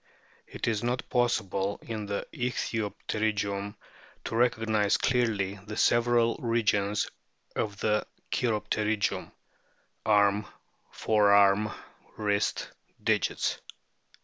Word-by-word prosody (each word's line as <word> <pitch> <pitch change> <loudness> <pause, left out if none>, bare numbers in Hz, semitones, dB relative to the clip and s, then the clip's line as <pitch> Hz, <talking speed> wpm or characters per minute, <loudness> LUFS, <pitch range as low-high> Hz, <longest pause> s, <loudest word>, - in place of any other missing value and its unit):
It - - -5
is 110 -3 +1
not 120 +2 -2
possible 100 -5 +1
in 110 -3 -5
the 100 0 -3
ichthyopterygium 105 -3 -2 0.5
to - - -5
recog 115 -1 +2
nise 105 -2 +2
clearly 105 -6 +1
the 105 0 -6
several 120 0 +3
regions 105 -4 +1 0.5
of 105 -2 -2
the 105 -1 +1 0.2
cheiropterygium 105 -2 0 0.7
arm, 105 -1 +3 0.4
forearm, 100 -1 +4 0.5
wrist, 105 -1 0 0.3
digits. - - +1
105 Hz, 90 wpm, -28 LUFS, 100-115 Hz, 0.7 s, forearm